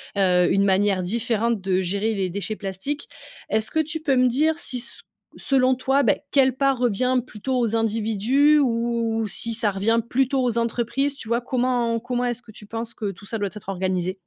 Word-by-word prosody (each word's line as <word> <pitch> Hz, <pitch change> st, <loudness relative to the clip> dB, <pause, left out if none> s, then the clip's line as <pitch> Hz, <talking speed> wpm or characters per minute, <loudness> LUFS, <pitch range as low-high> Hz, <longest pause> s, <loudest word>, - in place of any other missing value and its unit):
heu, 180 Hz, -2 st, +3 dB
une 195 Hz, -, +3 dB
manière 195 Hz, -1 st, +2 dB
différente 230 Hz, +2 st, 0 dB
de 190 Hz, 0 st, 0 dB
gérer 200 Hz, +5 st, -1 dB
les 190 Hz, -3 st, -1 dB
déchets 200 Hz, +3 st, -3 dB
plastiques. 205 Hz, +9 st, -5 dB, 0.4 s
Est-ce 220 Hz, 0 st, +1 dB
que 315 Hz, -, 0 dB
tu 315 Hz, +1 st, -1 dB
peux 285 Hz, -4 st, +1 dB
me 255 Hz, 0 st, +4 dB
dire 310 Hz, +6 st, +1 dB
si 255 Hz, -, -3 dB
s 245 Hz, +2 st, -5 dB, 0.4 s
selon 260 Hz, -1 st, +2 dB
toi, 265 Hz, +2 st, +1 dB
bah, 225 Hz, -, +4 dB, 0.2 s
quelle 265 Hz, -2 st, +3 dB
part 275 Hz, -2 st, +1 dB
revient 250 Hz, +2 st, +2 dB
plutôt 255 Hz, +3 st, -3 dB
aux 230 Hz, -2 st, 0 dB
individus 225 Hz, +7 st, +2 dB
ou 230 Hz, -3 st, 0 dB
si 230 Hz, +3 st, -2 dB
ça 220 Hz, -1 st, +2 dB
revient 210 Hz, +4 st, +1 dB
plutôt 265 Hz, +2 st, +1 dB
aux 240 Hz, -2 st, 0 dB
entreprises? 240 Hz, +4 st, -1 dB
Tu 230 Hz, -, -9 dB
vois? 235 Hz, +2 st, +1 dB
Comment 245 Hz, -2 st, 0 dB
comment 245 Hz, +1 st, -2 dB
est-ce 240 Hz, 0 st, -2 dB
que 220 Hz, -, -14 dB
tu 210 Hz, -, -12 dB
penses 230 Hz, +1 st, -5 dB
que 210 Hz, -2 st, -3 dB
tout 195 Hz, +2 st, -14 dB
ça 225 Hz, +2 st, -4 dB
doit 200 Hz, -1 st, -1 dB
être 205 Hz, -2 st, -9 dB
organisé? 185 Hz, -1 st, -1 dB
230 Hz, 200 wpm, -23 LUFS, 205-255 Hz, 0.4 s, me